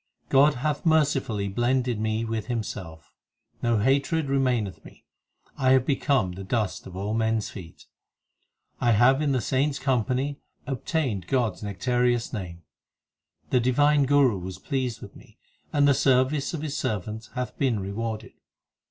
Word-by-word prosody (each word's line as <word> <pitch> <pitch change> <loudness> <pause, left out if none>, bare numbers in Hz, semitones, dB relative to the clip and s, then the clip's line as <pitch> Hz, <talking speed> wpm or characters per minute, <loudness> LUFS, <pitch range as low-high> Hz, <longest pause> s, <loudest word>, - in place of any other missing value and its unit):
God 145 +2 +5
hath 145 +3 -2
mercifully 140 -10 +1
blended 120 +2 0
me 110 +1 -1
with 110 -1 -3
Himself. 95 - -5 0.5
No 120 -1 +2
hatred 140 +6 +1
remaineth 125 - 0
me; - - -16 0.5
I 130 0 +4
have 130 -1 +3
become 135 - +1
the 95 +2 -7
dust 105 +1 -2
of 90 - -10
all 100 +3 -3
men 110 0 +1
s 110 - -3
feet; 90 -5 -11 0.9
And 120 - +2
I - - +5
have 130 +6 +4
in 150 -2 +1
the 130 - +2
saints 135 +4 0
company 130 +2 0 0.3
obtained 135 - -2
God 120 -6 +1
s - - -17
nec 100 -3 -6
tareous 125 -1 +1
name. 85 -6 -6 0.9
The 125 - +4
divine 140 +3 +3
Guru 135 -7 +4
was 90 0 -7
pleased 125 +1 -3
with 100 - -11
me, - - -17 0.3
And 145 -1 +3
the 140 - +6
service 135 +2 +2
of 155 - -5
his 150 -3 -3
servant 110 +2 -3
hath 125 -1 -3
been 125 -6 +1
rewarded. 110 +3 -4
125 Hz, 160 wpm, -26 LUFS, 105-135 Hz, 0.9 s, the